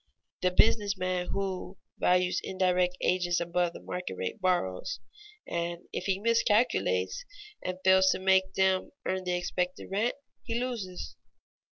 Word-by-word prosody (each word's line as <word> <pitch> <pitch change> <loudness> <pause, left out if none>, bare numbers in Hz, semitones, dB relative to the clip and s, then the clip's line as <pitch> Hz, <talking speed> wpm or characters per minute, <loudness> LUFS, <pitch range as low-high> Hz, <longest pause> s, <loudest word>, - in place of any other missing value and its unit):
The 185 - +3
business 205 +1 +3
man 185 -1 -1
who 190 -1 -3 0.2
values 180 0 +3
indirect 180 -1 +1
agents 175 -1 +2
above 170 0 0
the - - -9
market 180 - -4
rate 95 - -4
borrows, 125 - 0 0.5
and 170 0 -2
if - - -3
he 195 -1 +1
miscalculates 205 - +2 0.4
and 185 0 -3
fails 190 0 +6
to - - +2
make 190 0 +3
them 190 0 +2
earn 185 0 -1
the 180 - 0
expected 180 +1 -2
rent, 215 +5 +1 0.3
he 230 0 -2
loses. 225 -8 -4
185 Hz, 140 wpm, -29 LUFS, 180-190 Hz, 0.5 s, fails